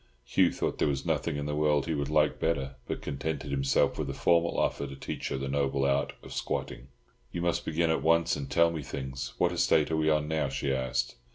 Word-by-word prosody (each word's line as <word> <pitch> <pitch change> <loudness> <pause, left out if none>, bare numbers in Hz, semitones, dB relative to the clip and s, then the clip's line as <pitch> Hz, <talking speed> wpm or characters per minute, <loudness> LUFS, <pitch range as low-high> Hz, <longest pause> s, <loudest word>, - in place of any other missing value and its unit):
Hugh - - +3
thought - - -2
there - - +3
was 70 -2 -1
nothing 80 - 0
in 70 - -3
the 75 - -2
world 75 -2 +2
he 80 - -1
would 70 -1 -2
like 75 -1 +2
better, 70 -5 -1
but - - -4
contented 75 +1 -3
himself 70 0 +2
with - - -2
a - - -4
formal 85 0 +2
offer 70 - 0
to 70 - -8
teach 70 - -5
her - - -2
the 70 +1 -3
noble 70 0 0
art 70 +1 +1
of - - -9
squatting. 60 - -3 0.4
"You 85 - -3
must 85 -1 0
begin 80 +1 +1
at 80 - +1
once 85 +1 +3
and 70 -2 -5
tell 85 0 +4
me 80 -2 -4
things. 65 -1 -5
What - - +2
estate 80 0 +2
are 80 - +1
we 80 0 +2
on 75 -1 +2
now?" 80 -3 0
she 70 0 -1
asked. 65 -2 -1
75 Hz, 235 wpm, -29 LUFS, 70-80 Hz, 0.4 s, tell